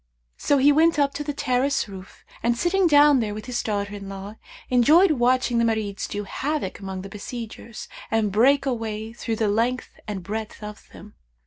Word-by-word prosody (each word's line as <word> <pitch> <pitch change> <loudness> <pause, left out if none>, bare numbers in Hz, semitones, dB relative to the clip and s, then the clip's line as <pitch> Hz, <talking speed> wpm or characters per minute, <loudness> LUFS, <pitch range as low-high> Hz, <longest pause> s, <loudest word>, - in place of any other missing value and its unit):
So 285 - +2
he 280 +2 +5
went 325 +3 +4
up 280 -1 +2
to 295 - -4
the 295 - -3
terrace 270 -2 0
roof 190 -1 -12 0.2
and 235 +1 +1
sitting 360 +5 +2
down 290 -2 +6
there 210 -3 -2
with 215 - -7
his 250 -1 -2
daughter 205 -1 -2
in 200 -1 -7
law, 195 +2 -8 0.3
enjoyed 305 +9 +5
watching 250 -2 +2
the - - +3
Marids 220 -3 -1
do 205 0 -4
havoc 275 0 -3
among 190 -1 -6
the - - -7
besiegers 225 +2 -8 0.2
and 220 -2 +1
break 270 +7 +4
a 265 - +1
way 220 -1 -5
through 230 -1 -3
the 220 -1 0
length 235 +5 -1
and 200 -4 -5
breadth 215 +3 -6
of 210 0 -9
them. 210 +3 -13
230 Hz, 195 wpm, -24 LUFS, 210-275 Hz, 0.3 s, down